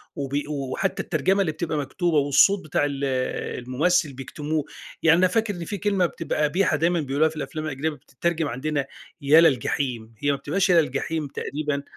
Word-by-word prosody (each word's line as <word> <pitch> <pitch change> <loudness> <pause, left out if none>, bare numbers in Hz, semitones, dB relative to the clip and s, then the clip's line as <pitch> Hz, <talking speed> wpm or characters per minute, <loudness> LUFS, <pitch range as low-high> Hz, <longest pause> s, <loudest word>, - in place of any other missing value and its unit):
وبي 140 +1 -3
و 150 - -6 0.2
وحتى 195 +6 -1
الترجمة 195 +1 +1
اللي 165 -5 +1
بتبقى 160 -1 -3
مكتوبة، 155 +4 0
والصوت 145 +8 +4
بتاع 145 -1 +1
ال 140 -1 -3 0.6
الممثل 155 +3 +1
بيكتموه 150 +3 -3 0.4
يعني، 165 +1 +6
أنا 185 - +5
فاكر 220 +2 0
إن 170 -1 -6
في 205 - -4
كلمة 195 -2 +1
بتبقى 160 -2 -2
قبيحة 155 +1 +2
دايمًا 170 +2 +2
بيقولوها 145 +3 +1
في 160 - -12
الأفلام 155 +2 -5
الأجنبية، 145 +1 -2
بتترجم 160 +2 -3
عندنا 145 +3 -2 0.4
"ا 150 +3 +7
للجحيم" 125 -6 +1
هي 145 0 +1
ما 140 - -1
بتبقاش 180 +8 0
يا 170 -2 +6
للجحيم 150 +2 -2
تقريبًا، 145 0 -3
155 Hz, 175 wpm, -24 LUFS, 140-170 Hz, 0.6 s, ا